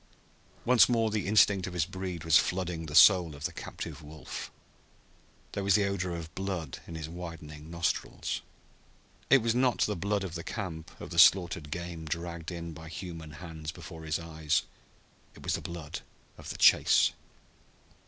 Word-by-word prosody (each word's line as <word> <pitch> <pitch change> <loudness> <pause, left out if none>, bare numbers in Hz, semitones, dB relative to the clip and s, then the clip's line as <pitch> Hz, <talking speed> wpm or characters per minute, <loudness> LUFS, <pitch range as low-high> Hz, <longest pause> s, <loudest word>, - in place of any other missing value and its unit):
Once 120 -3 +6
more 115 -2 +2
the 105 -3 -1
instinct 100 -2 +4
of 90 - -6
his 85 -3 +2
breed 90 -2 -5
was 80 -2 +3
flooding 90 -3 +1
the 75 - -5
soul 90 -6 +7
of 70 - -10
the - - -1
captive 80 -3 -7
wolf. 75 +1 -8 1.0
There 100 - -3
was 100 -1 +4
the 105 -2 +3
odor 95 -3 -2
of 80 -1 -7
blood 90 -7 -4
in 85 - -7
his 80 -1 -5
widening 80 -3 -8
nostrils. 85 0 -2 0.9
It 135 -4 +6
was 115 -1 +2
not 125 0 +2
the 105 - +2
blood 100 +2 -1
of 90 -4 -5
the 85 -1 -5
camp, 85 -7 -6
of - - -8
the - - 0
slaughtered 85 -5 +5
game 85 0 -5
dragged 85 +1 -4
in 85 -2 -6
by 80 +1 -10
human 80 -2 -7
hands 80 -1 -7
before 80 -1 -10
his 80 0 0
eyes. 80 -2 -1 0.7
It - - -14
was - - 0
the - - -1
blood 85 -3 -6 0.4
of - - -10
the - - -5
chase! - - +6
85 Hz, 175 wpm, -30 LUFS, 80-95 Hz, 1.0 s, soul